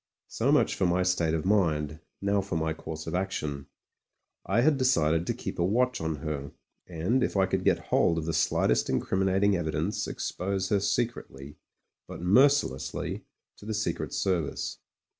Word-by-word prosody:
So - - 0
much - - +3
for 95 - +1
my 90 +1 +2
state 85 -3 +1
of 80 - -3
mind; 80 -7 +1 0.2
now, 100 0 +2
for 95 -2 -5
my 80 0 0
course 80 0 -7
of 80 - -5
action. 75 -7 -3 0.8
I 120 - +3
had 145 +2 +3
decided 85 - +2
to - - +1
keep - - -6
a - - +3
watch 125 +6 +1
on 80 -1 -1
her, 75 -3 -5 0.3
and, 90 +10 0
if - - -1
I 95 - +4
could - - -1
get - - +3 0.2
hold 85 - +3
of 80 - -2
the 80 - -2
slightest 80 0 +2
incriminating 95 +8 +1
evidence, 80 +2 -2
expose 95 0 -3
her 100 - +3
secretly, 95 - -3 0.5
but - - -8
mercilessly, 120 - +2 0.3
to - - -13
the 110 - -2
Secret 105 - -2
Service. 85 -7 -2
90 Hz, 165 wpm, -28 LUFS, 80-100 Hz, 0.8 s, I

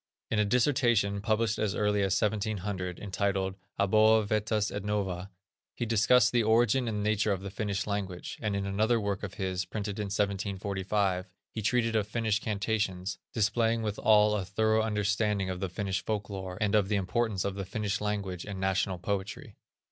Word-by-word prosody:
In 110 - +2
a 105 - +3
dissertation, 120 -4 +2
published 110 +1 +1
as 105 -3 0
early 105 -1 +1
as 95 -1 +2
1700, 100 -4 -2
entitled, 100 -1 -1 0.3
Aboa 110 +2 +5
vetus 105 0 0
et - - -4
nova, 100 -3 -2 0.5
he 120 - -2
discussed 115 +1 +4
the 120 - +3
origin 120 +3 +3
and 105 -2 -2
nature 105 0 +1
of 95 -1 -2
the 100 - -5
Finnish 100 -2 -2
language; 100 -3 -4
and 105 -3 -1
in 100 0 -2
another 110 +4 +2
work 100 -2 -2
of 95 -2 -6
his, 95 -1 -2
printed 100 +2 -5
in 105 - -1
1745, 100 -1 -1 0.2
he 110 - -4
treated 115 +1 +1
of 105 -2 +1
Finnish 110 -1 0
incantations, 100 -4 -2
displaying 115 +1 +1
withal 105 0 +4
a 105 -2 0
thorough 110 +4 +1
understanding 105 -2 0
of 90 - -5
the 95 -1 -2
Finnish 95 +1 -2
folk 105 -1 -3
lore, 95 -2 -5
and 105 -1 +1
of 105 -2 +3
the 105 - +2
importance 100 +1 0
of 100 - -1
the 100 0 -4
Finnish 105 +2 -2
language 100 -4 -2
and 100 -2 -6
national 95 -1 0
poetry. 100 +3 -4
105 Hz, 175 wpm, -29 LUFS, 95-110 Hz, 0.5 s, Aboa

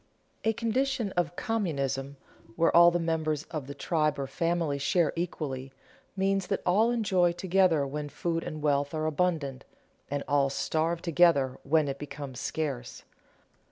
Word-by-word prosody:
_ - - -38 0.4
A 225 - +3
condition 235 0 -1
of 175 -1 -1
communism, 140 - -2 0.4
where 165 - +2
all 170 0 +9
the 175 - 0
members 160 -3 -1
of 155 -5 -4
the 140 - -7
tribe 155 0 0
or 140 - -2
family 165 0 -1
share 150 +4 +2
equally, 135 -6 -4 0.4
means 195 -1 0
that 195 - -2
all 210 +6 +4
enjoy 190 -7 +2
together 180 -4 +2
when 145 +1 -4
food 165 +3 -2
and 155 -1 -6
wealth 145 0 +1
are 155 0 -1
abundant, 155 -4 -1 0.5
and 145 0 -2
all 140 -1 +3
starve 160 +4 -1
together 165 -6 +3
when 155 +1 +2
it 140 0 -4
becomes 140 -3 -7
scarce. 140 -6 -4
160 Hz, 155 wpm, -29 LUFS, 140-175 Hz, 0.5 s, all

